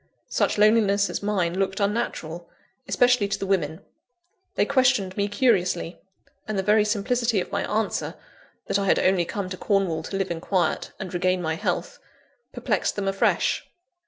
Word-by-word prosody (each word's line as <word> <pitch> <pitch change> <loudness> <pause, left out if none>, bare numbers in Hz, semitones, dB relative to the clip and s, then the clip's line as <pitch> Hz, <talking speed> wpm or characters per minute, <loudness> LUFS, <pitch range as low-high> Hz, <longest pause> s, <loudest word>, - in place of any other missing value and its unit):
Such - - +1
loneliness 205 -2 +4
as - - -3
mine 190 -3 0
looked 195 0 -1
unnatural 200 -6 -2 0.4
especially 245 -4 +3
to 200 - -2
the - - -4
women. 165 -5 -1 0.7
They - - +2
questioned 255 -9 +2
me 200 0 0
curiously; 185 -7 +1 0.5
and 215 -2 -2
the 190 - 0
very 210 +2 +4
simplicity 230 +1 0
of 180 - -5
my - - -2
answer, 215 0 -1 0.5
that 200 - 0
I 200 - -1
had - - +4
only 185 -2 +2
come 200 +2 -4
to 185 - -4
Cornwall 190 -6 0
to 195 +4 -5
live 195 -2 -2
in 165 -1 -4
quiet, 185 -1 0
and 185 -2 -6
regain 185 +1 +1
my 160 -2 -1
health, - - -3 0.5
perplexed - - -1
them 200 -1 -2
afresh. 195 0 +1
195 Hz, 165 wpm, -24 LUFS, 180-210 Hz, 0.7 s, loneliness